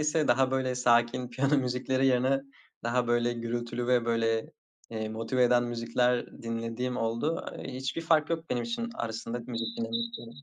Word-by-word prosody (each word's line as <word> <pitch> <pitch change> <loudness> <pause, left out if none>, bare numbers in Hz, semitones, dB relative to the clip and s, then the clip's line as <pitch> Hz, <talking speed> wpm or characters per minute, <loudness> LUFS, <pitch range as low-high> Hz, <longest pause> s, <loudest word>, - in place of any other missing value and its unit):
ise 150 0 +1
daha 130 +2 +4
böyle 130 -1 0
sakin 120 0 +3
piyano 135 +4 +2
müzikleri 130 0 +1
yerine 130 +1 +3 0.4
daha 120 +1 +1
böyle 120 0 +2
gürültülü 120 +1 -3
ve 125 -2 +3
böyle, 115 -1 0 0.4
eee, 110 -1 -3
motive 115 +4 0
eden 120 0 +4
müzikler 120 +1 +1 0.2
dinlediğim 115 +2 -2
oldu. 115 +8 -1
Eee, - - -6
hiçbir 135 +5 -3
fark 160 -2 +3
yok 165 0 -2
benim 120 - 0
için 235 0 -3
arasında 115 - -3
müzik 115 -2 -2
dinlemek 230 - -4
125 Hz, 155 wpm, -29 LUFS, 115-135 Hz, 0.4 s, daha